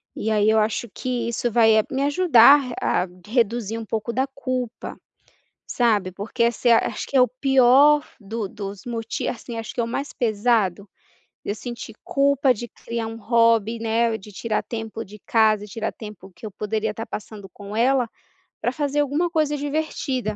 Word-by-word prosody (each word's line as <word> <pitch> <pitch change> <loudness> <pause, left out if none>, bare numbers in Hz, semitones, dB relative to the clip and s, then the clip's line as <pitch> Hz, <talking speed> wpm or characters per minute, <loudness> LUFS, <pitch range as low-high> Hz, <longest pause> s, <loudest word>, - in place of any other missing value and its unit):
e 220 - -2
aí 210 0 +3
eu 220 - +4
acho 220 +1 0
que 245 -3 -3
isso 235 0 -1
vai 225 -1 +5 0.2
me 270 +1 -1
ajudar 285 -3 +6 0.2
a - - +1
re 180 - -9 0.2
a - - -13
reduzir 230 -2 0
um 225 - -5
pouco 225 +2 -3
da 265 +2 +1
culpa, 255 -3 -5 0.7
sabe, 210 -6 +1
porque 210 +5 -2
essa 235 +1 +1
é 230 - +7
acho 210 - -4
que 275 - 0
é - - +7
o 250 - +5
pior 270 +3 +4
do 210 0 -4
dos 200 +1 -8
m 235 -1 -3 0.3
assim 235 -1 -5
acho 225 - -6
que 240 - -1
é - - 0
o - - -3
mais 275 +4 -4
pesado, 210 -4 0 0.6
eu 205 - -3
sentir 235 -1 -8
culpa 275 -1 +3
de 240 +1 -7
criar 230 +1 -5
um 225 0 -6
hobby, 230 -1 +2
né, 225 0 0
de 210 +2 -13
tirar 215 +2 -2
tempo 225 -1 -6
de 210 +2 -13
casa, 215 -2 +3
tirar 220 +1 -4
tempo 210 -3 -11
que - - -14
eu 215 - -5
poderia 215 +1 -2
estar 225 +2 -6
passando 205 -2 -8
com 200 +2 -10
ela, 245 0 +2 0.5
para 245 - -1
fazer 290 +1 -1
alguma 295 +5 0
coisa 305 -2 0
divertida, 280 -6 -2
230 Hz, 185 wpm, -23 LUFS, 215-255 Hz, 0.7 s, é